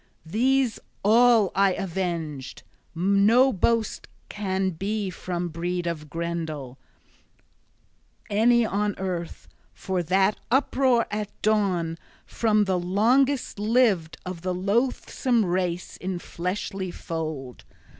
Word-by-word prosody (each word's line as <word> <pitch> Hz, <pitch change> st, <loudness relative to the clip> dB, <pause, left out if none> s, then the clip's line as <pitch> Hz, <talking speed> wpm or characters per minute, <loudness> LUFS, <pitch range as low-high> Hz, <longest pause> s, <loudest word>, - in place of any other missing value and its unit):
These 250 Hz, +6 st, +1 dB, 0.2 s
all 225 Hz, -1 st, +5 dB
I 195 Hz, -1 st, +3 dB
avenged. 170 Hz, -7 st, -4 dB, 0.3 s
No 200 Hz, +9 st, +4 dB
boast 225 Hz, +3 st, 0 dB, 0.2 s
can 190 Hz, -2 st, -1 dB
be 195 Hz, +3 st, -3 dB
from 175 Hz, 0 st, -4 dB
breed 175 Hz, +2 st, -3 dB
of 155 Hz, -3 st, -4 dB
Grendel, 160 Hz, -6 st, -4 dB, 1.5 s
any 235 Hz, +3 st, +4 dB
on 205 Hz, -1 st, -1 dB
earth, 180 Hz, -3 st, -5 dB, 0.3 s
for 190 Hz, -2 st, -2 dB
that 190 Hz, +4 st, +2 dB
uproar 260 Hz, -1 st, +3 dB
at 210 Hz, -1 st, -3 dB
dawn, 185 Hz, -6 st, +1 dB, 0.3 s
from 215 Hz, -2 st, +2 dB
the 190 Hz, -2 st, 0 dB
longest 235 Hz, +9 st, +2 dB
lived 210 Hz, -7 st, +2 dB
of 180 Hz, -2 st, -6 dB
the 185 Hz, 0 st, -2 dB
loathsome 230 Hz, +3 st, 0 dB
race 180 Hz, -1 st, -2 dB
in 185 Hz, 0 st, -4 dB
fleshly 185 Hz, +2 st, -4 dB
fold! 155 Hz, -7 st, -5 dB
190 Hz, 105 wpm, -25 LUFS, 175-220 Hz, 1.5 s, all